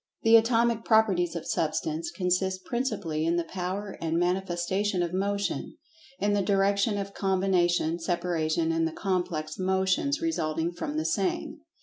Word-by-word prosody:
The 225 0 +7
Atomic 230 0 +3
Properties 190 -6 +3
of 170 - -4
Substance 160 0 -1
consist 185 0 -1
principally 205 -11 -2
in 165 +1 +1
the 170 - +1
power 190 +3 -5
and 165 0 0
manifestation 180 +2 0
of 170 0 -3
Motion, 200 +1 -2 0.4
in 205 +1 +1
the 205 - +2
direction 200 +1 +2
of 200 0 -4
combination, 180 -3 +1
separation, 165 -1 0
and 165 0 +1
the 160 - -6
complex 175 -5 -2
motions 190 +10 +1
resulting 165 - -1
from 150 -3 -4
the 155 - -1
same. 195 - -1
185 Hz, 140 wpm, -27 LUFS, 165-200 Hz, 0.4 s, The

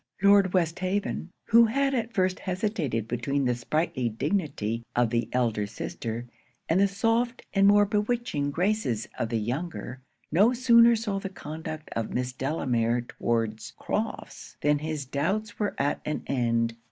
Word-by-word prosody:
Lord 200 -2 +6
Westhaven, 185 +1 -1 0.2
who 230 +1 +6
had 275 +4 +1
at 235 -2 -1
first 185 -3 +1
hesitated 180 - -2
between 135 +4 -1
the 125 - +2
sprightly 130 0 -1
dignity 115 - -2
of 120 -2 +2
the 115 -1 0
elder 115 -5 0
sister, 115 +3 -5 0.4
and 165 - +2
the 200 - +5
soft 230 +5 0
and 195 0 +5
more 205 0 +6
bewitching 210 -8 -1
graces 170 - 0
of 115 - -1
the 115 - 0
younger, 130 +2 -4 0.3
no 205 +10 +5
sooner 235 -1 +6
saw 215 -3 -2
the 195 -1 -5
conduct 155 -2 -7
of 115 -1 -3
Miss 125 0 -1
Delamere 125 -4 0
towards 115 -2 -2
Crofts, - - -4
than 145 0 +3
his 155 -2 -4
doubts 195 +11 -2
were 210 -1 -1
at 145 +1 0
an 150 - -3
end. 115 -3 0
155 Hz, 150 wpm, -27 LUFS, 120-205 Hz, 0.4 s, Lord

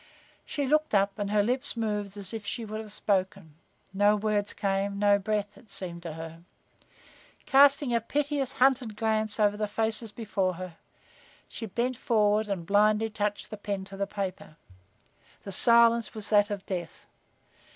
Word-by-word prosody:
She 285 - -2
looked 305 -2 +2
up 200 +1 +1
and 205 -1 -2
her 210 0 +3
lips 250 +3 0
moved 210 -3 -2
as 200 +1 -4
if 220 -2 -5
she 230 +2 -4
would 215 +1 -5
have 215 -1 -10
spoken. 190 -6 -1 0.4
No 205 +2 +4
words 210 -1 0
came, 200 0 -1
no 205 0 +4
breath, 205 0 -2
it 240 -6 -19
seemed 175 -3 -6
to 165 -2 -6
her. 165 +1 -9 1.0
Casting 275 -1 +5
a 235 - +2
piteous, 280 +2 -1
hunted 255 -4 +2
glance 220 -1 0
over 205 -1 +3
the 210 0 -2
faces 220 +1 -1
before 200 -4 -2
her, 180 -1 -8 0.7
she 225 - -7
bent 240 +5 -2
forward 215 -2 +2
and 185 -4 -3
blindly 210 +3 +3
touched 210 -1 -3
the 215 - -6
pen 200 -2 -4
to 195 - -10
the 200 0 -2
paper. 195 -6 -5 0.9
The 200 - -7
silence 235 +2 +4
was 215 -1 -6
that 205 0 +5
of 200 -2 -5
death. 175 -3 -6
210 Hz, 165 wpm, -28 LUFS, 200-225 Hz, 1.0 s, Casting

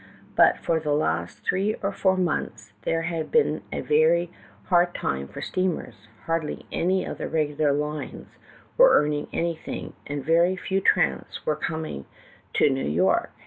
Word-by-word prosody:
But - - +5
for 165 -1 0
the 150 -2 -1
last 150 - -1
three 200 +3 +1
or 200 - 0
four 190 -1 +1
months 155 - -2
there 165 0 0
had 165 -1 -3
been 465 - +2
a - - -3
ver}" 475 +3 +3 0.4
hard 175 -1 +3
time 70 0 -2
for - - -8
steamers; 160 - -3 0.2
hardly 165 -2 -2
any 185 +2 +1
of - - -6
the - - -3
regular 150 -2 +1
lines 150 +1 -4 0.4
were - - +8
earning 150 0 0
anything, 170 -1 -3
and 145 -2 -4
very 170 +4 +3
few 190 +1 -1
tramps 180 - +1
were 155 - +1
coming 155 - -4 0.5
to 145 - +4
New 135 0 -1
York. 90 +5 +2
165 Hz, 155 wpm, -25 LUFS, 145-185 Hz, 0.5 s, were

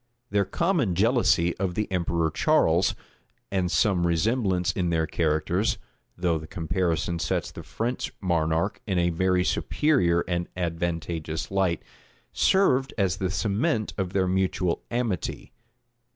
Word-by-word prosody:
Their 100 -1 +2
common 145 - 0
jealousy 100 -5 +3
of 95 -2 -2
the 105 - -1
emperor 85 -3 0
Charles, - - +3 0.6
and 95 -2 0
some 90 -3 +2
resemblance 90 0 +1
in 90 0 -1
their 80 -1 +1
characters, 80 -2 0 0.4
(though 85 -2 +1
the 80 - -9
comparison 85 -1 -1
sets - - -1
the - - -9
French 120 +3 -3
monarch 85 0 0
in 95 -3 0
a 85 0 +2
very 90 +2 +2
superior 90 - +2
and 85 0 -2
advantageous 85 -2 -3
light,) 95 -4 0 0.5
served 135 -9 +3
as 95 -3 +1
the 95 -1 -1
cement 110 - 0
of 95 -3 -2
their 95 -1 +2
mutual 90 -1 0
amity. 115 -8 -3
90 Hz, 130 wpm, -26 LUFS, 85-100 Hz, 0.6 s, jealousy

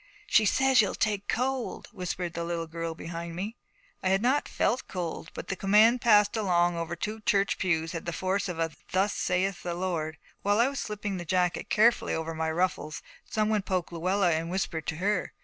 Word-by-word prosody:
She 220 - +4
says 265 +3 +5
you'll 205 - -1
take 205 -2 -1
cold,' 255 +1 -2
whispered 180 -3 -4
the 170 - -3
little 170 -1 -2
girl 165 0 -4
behind 170 +1 -6
me. 205 +6 -4 0.5
I 185 - +1
had 195 +3 +2
not 265 +4 +2
felt 250 - 0
cold, 170 -3 -4
but - - -7
the 195 - -1
command 215 +6 +5
passed 210 -3 +5
along 175 -5 +2
over 170 0 -3
two 215 +5 -4
church 200 -1 +1
pews 165 -3 0
had 165 -1 -6
the - - 0
force 190 +3 -1
of 175 - -4
a 165 -1 0 0.2
Thus 195 +2 +2
saith 180 +1 0
the 175 -1 -3
Lord. 170 -4 -2 0.2
While 205 +2 +2
I 240 +3 +4
was 275 -2 -4
slipping 205 -3 -3
the 175 - -5
jacket 180 +1 0
carefully 235 +3 +3
over 160 0 -3
my 160 0 -1
ruffles, 160 -2 -1 0.3
some 215 -1 +1
one 215 -1 +2
poked 185 -3 -2
Luella 180 +2 +2
and 165 +1 -1
whispered 175 -4 -2
to 155 - -1
her. 195 +3 -1
185 Hz, 200 wpm, -28 LUFS, 170-210 Hz, 0.5 s, says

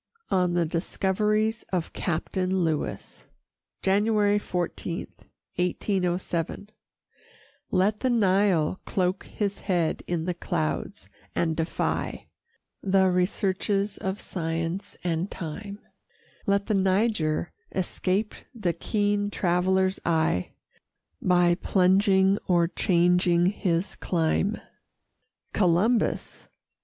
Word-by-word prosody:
ON 180 -2 +2
THE 175 -1 +2
DISCOVERIES 210 +6 0
OF 180 -3 -2
CAPTAIN 185 +2 -1
LEWIS 160 -3 -3 0.6
[January 205 +1 +3
14, 175 -2 -3 0.5
1807] 180 +1 -1 1.0
Let 200 +3 +2
the 260 - +1
Nile 195 -6 +2
cloak 185 0 -1
his 200 -2 -2
head 175 -5 0
in 170 -2 -1
the 180 - 0
clouds, 80 - -3 0.3
and 165 -2 +1
defy 165 +1 -2 0.6
The 190 -1 +3
researches 195 +2 0
of 190 +1 -3
science 165 +3 -3
and 175 +2 -1
time; 200 +5 -6 0.7
Let 200 0 +2
the 220 - 0
Niger 190 -5 +1 0.2
escape 190 +3 -1 0.2
the 185 -7 0
keen 205 0 0
traveller's 190 0 +1
eye, 160 - +1 0.7
By 175 -1 +4
plunging 190 +2 +3
or 175 -2 +3
changing 175 0 +3
his 185 -1 0
clime. 180 +5 0 0.9
Columbus! 200 +6 +1
185 Hz, 90 wpm, -26 LUFS, 175-200 Hz, 1.0 s, By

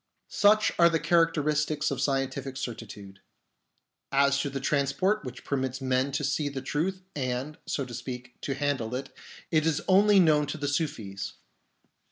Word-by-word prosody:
Such 210 +1 +4
are 170 0 +7
the 165 -1 +1
characteristics 155 -2 +1
of 135 -1 -2
scientific 135 -1 -1
certi 120 -5 -5
tude. 100 -1 -11 0.9
As 140 0 +3
to 140 - -1
the 135 0 -4
transport 150 +10 +1
which 125 -1 -8
permits 130 -2 -2
men 130 +1 0
to - - -1
see 150 -2 0
the 135 -1 -5
truth 185 +7 -2
and, 130 +2 -3
so 140 - -1
to 125 - -10
speak, 125 0 -7
to 135 - -2
handle 135 -5 -1
it, 135 +1 -6 0.4
it 155 0 +3
is 155 -2 +1
only 200 +1 +6
known 150 -4 +4
to 145 - -4
the 145 -1 -3
Sufis. 120 - -3
140 Hz, 165 wpm, -28 LUFS, 130-155 Hz, 0.9 s, are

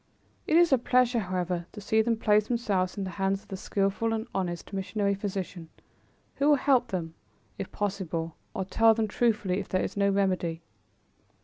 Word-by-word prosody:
It 315 - +4
is 340 -4 +5
a 265 - +5
pleasure, 250 -1 +3
however, 180 -3 -2
to 210 - -8
see 220 +2 +2
them 230 0 +1
place 210 -1 +3
themselves 205 -7 0
in 200 - -2
the 190 - -4
hands 195 +1 0
of - - -26
the 195 - -4
skillful 195 +4 0
and 220 0 -2
honest 175 -1 -3
missionary 200 +1 0
physician, 190 -4 -5 0.7
who 280 +2 +3
will 295 - +7
help 260 -2 +3
them, 170 -5 -4 0.5
if 195 - -5
possible, 175 -5 -3 0.2
or 190 - -2
tell 225 +3 +4
them 220 -1 0
truthfully 210 -4 +1
if 200 - -6
there 185 - +1
is - - -4
no 200 0 +2
remedy. 185 -4 0
200 Hz, 185 wpm, -28 LUFS, 185-225 Hz, 0.7 s, will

